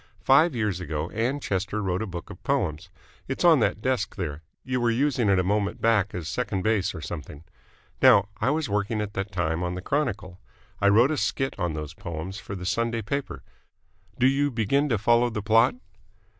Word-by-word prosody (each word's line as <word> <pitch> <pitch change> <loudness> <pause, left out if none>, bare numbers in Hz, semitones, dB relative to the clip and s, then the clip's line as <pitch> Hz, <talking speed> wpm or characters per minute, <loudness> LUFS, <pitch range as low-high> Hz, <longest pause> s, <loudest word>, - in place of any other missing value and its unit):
Five 145 +3 +5
years 105 -6 -1
ago 80 -2 -4
Ann 120 +6 -1
Chester 100 -3 -2
wrote 95 0 -1
a 110 - -3
book 85 -3 -7
of - - -12
poems. 80 +4 -1 0.4
It's 135 - -3
on 165 -4 +7
that 105 -2 0
desk 130 -6 -1
there. 80 -6 -4 0.2
You 125 -1 -2
were 120 - +2
using 125 -2 +1
it 95 - +4
a 90 - +2
moment 100 +2 0
back 110 -3 +2
as 85 -3 -5
second 100 -1 -2
base 110 -3 +1
or - - -6
something. 75 -1 -7 0.6
Now, 100 0 +6
I 110 +5 0
was 155 0 0
working 105 +1 -1
at 105 -1 -3
that 95 +1 -4
time 85 -2 -1
on 90 0 -2
the - - -4
Chronicle. 100 -11 -2 0.4
I 100 - +5
wrote 120 +8 +5
a 155 - -1
skit 135 -1 -1
on 85 -3 -1
those 75 0 -6
poems 90 +1 -6
for 100 - -7
the 90 -1 -7
Sunday 115 +3 -1
paper. 140 +6 -4 0.7
Do 125 - +2
you 140 +2 +3
begin 135 +5 +1
to 115 - +2
follow 120 +4 +3
the 105 -3 -4
plot?" 115 +3 +4
105 Hz, 200 wpm, -26 LUFS, 90-125 Hz, 0.7 s, on